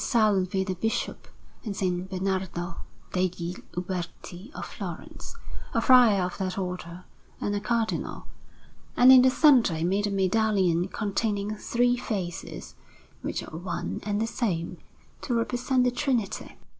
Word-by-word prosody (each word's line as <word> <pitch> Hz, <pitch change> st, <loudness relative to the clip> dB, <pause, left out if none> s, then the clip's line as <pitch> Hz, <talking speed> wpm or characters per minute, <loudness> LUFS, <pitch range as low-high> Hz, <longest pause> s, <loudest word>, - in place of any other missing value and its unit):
Salvi 195 Hz, -5 st, +2 dB
the 190 Hz, -1 st, -2 dB
Bishop, 225 Hz, +5 st, -2 dB, 0.4 s
and 210 Hz, -4 st, -4 dB
S. 190 Hz, -, 0 dB, 0.2 s
Bernardo 185 Hz, -2 st, -2 dB, 0.4 s
degli 180 Hz, -1 st, -1 dB, 0.2 s
Uberti 180 Hz, -, -5 dB
of -, -, -5 dB
Florence, -, -, -8 dB, 0.4 s
a -, -, +4 dB
friar 240 Hz, -7 st, +6 dB
of 180 Hz, +2 st, -4 dB
that 185 Hz, 0 st, -2 dB
Order 180 Hz, -1 st, -5 dB, 0.4 s
and 205 Hz, -, -1 dB
a -, -, 0 dB
Cardinal; 225 Hz, +1 st, -2 dB, 0.7 s
and 250 Hz, +1 st, +8 dB
in 260 Hz, -1 st, +10 dB
the 260 Hz, -, +6 dB
centre 255 Hz, -, +5 dB
he 160 Hz, -, -2 dB
made 195 Hz, +4 st, +1 dB
a -, -, -1 dB
medallion 190 Hz, -3 st, +2 dB
containing 205 Hz, 0 st, -1 dB
three 245 Hz, +3 st, +1 dB
faces, 190 Hz, -8 st, -5 dB, 0.5 s
which -, -, -3 dB
are -, -, -9 dB
one 175 Hz, +1 st, -4 dB
and 205 Hz, 0 st, -1 dB
the 225 Hz, -, +1 dB
same, 185 Hz, -8 st, -2 dB, 0.4 s
to 245 Hz, -, -1 dB
represent 250 Hz, +2 st, +1 dB
the 250 Hz, -, +3 dB
Trinity. 240 Hz, -5 st, -2 dB
200 Hz, 140 wpm, -27 LUFS, 180-230 Hz, 0.7 s, in